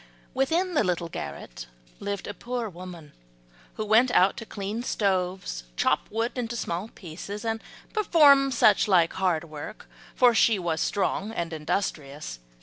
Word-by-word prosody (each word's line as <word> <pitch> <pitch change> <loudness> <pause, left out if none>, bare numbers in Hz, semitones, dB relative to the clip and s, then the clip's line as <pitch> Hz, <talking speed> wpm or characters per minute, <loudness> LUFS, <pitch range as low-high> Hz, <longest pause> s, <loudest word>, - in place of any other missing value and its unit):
Within 330 +8 +1
the 295 - +3
little 175 -3 -1
garret - - -7 0.3
lived 200 -1 -4
a 205 - -5
poor 240 +3 -4
woman, 175 -5 -10 0.6
who 215 - -3
went 225 +4 +5
out 190 -5 +4
to 225 - -7
clean 205 +3 -4
stoves, 185 - -1
chop - - +1
wood 225 +2 -1
into 235 -1 -3
small 180 -2 -3
pieces 200 +3 -8
and 225 0 -1 0.3
perform 295 -10 +6
such 215 -6 +4
like 175 -4 +4
hard 180 -4 +1
work, 155 +5 -9 0.3
for 245 -2 +6
she 225 -1 +4
was 170 -3 -1
strong 205 0 0
and 170 -6 -3
industrious. 150 - -3
200 Hz, 145 wpm, -26 LUFS, 170-230 Hz, 0.6 s, perform